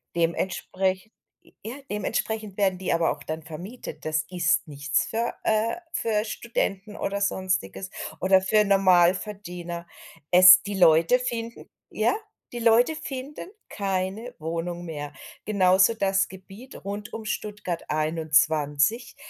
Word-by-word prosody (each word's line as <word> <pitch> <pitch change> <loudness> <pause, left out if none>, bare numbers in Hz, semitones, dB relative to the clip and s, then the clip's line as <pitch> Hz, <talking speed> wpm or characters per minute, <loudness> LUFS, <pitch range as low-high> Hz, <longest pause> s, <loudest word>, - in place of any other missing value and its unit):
Dementsprech 185 +3 -1 0.5
ja, 225 - -5 0.2
dementsprechend 210 0 -3
werden 190 -2 +1
die 185 - -1
aber 165 0 +2
auch 145 - -7
dann 160 +1 -5
vermietet. 180 +10 -9
Das 155 0 0
ist 175 -4 +1
nichts 145 -1 -1
für 230 +1 -2
äh, 220 +6 +1 0.2
für 215 -2 0
Studenten 210 -3 -3
oder 200 -1 -3
Sonstiges 185 - -1 0.3
oder 190 +1 +5
für 210 +3 +3
Normalverdiener. 180 -2 +1 0.4
Es 180 0 +9
die 205 0 -4
Leute 165 +6 +5
finden 235 -2 -5 0.2
ja, - - +1 0.4
die 240 - -4
Leute 235 +6 +4
finden 285 +1 -7 0.2
keine 195 +4 -3
Wohnung 170 +2 -4
mehr. 145 -3 -6 0.3
Genauso 190 +1 +4
das 195 -2 +1
Gebiet 195 +8 -12
rund 205 +1 -5
um 220 - -6
Stuttgart 210 -5 -4
21 155 - +1
190 Hz, 120 wpm, -25 LUFS, 170-215 Hz, 0.5 s, Es